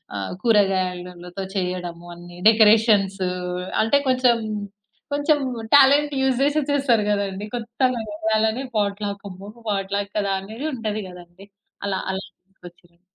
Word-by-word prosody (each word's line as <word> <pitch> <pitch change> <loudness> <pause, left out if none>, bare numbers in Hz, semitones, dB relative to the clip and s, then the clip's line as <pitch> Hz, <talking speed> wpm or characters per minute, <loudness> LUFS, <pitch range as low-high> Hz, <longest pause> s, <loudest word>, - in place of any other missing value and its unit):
ఆహ్, 95 -1 -4
కూరగాయలలతో 185 -4 0
చెయ్యడము 180 -2 -3
అన్ని 175 0 -12
డెకరేషన్స్. 215 -3 +4 0.6
అంటే 225 +6 +3
కొంచం, 255 -2 +3 0.7
కొంచం 290 +1 +2 0.4
టాలెంట్ 285 +1 +6
యూజ్ 265 -2 +2
జేసే 290 +2 +2
చేస్తారు 260 -7 +2
గదండీ! 200 0 -2
కొత్తగా 240 +1 -1
వెయ్యాలనే 220 +3 0
పాట్‌లాకమ్మో, 200 -1 -3 0.2
పాట్‌లాక్కదా 200 0 -1
అనేది 225 +10 -6
ఉంటది 215 -3 -3
గదండీ! 180 +2 -14 0.4
అలా 195 -1 -1
అలా 190 +1 -4 0.2
నాకొచ్చినాయి. 175 -2 -17
205 Hz, 105 wpm, -22 LUFS, 185-235 Hz, 0.7 s, టాలెంట్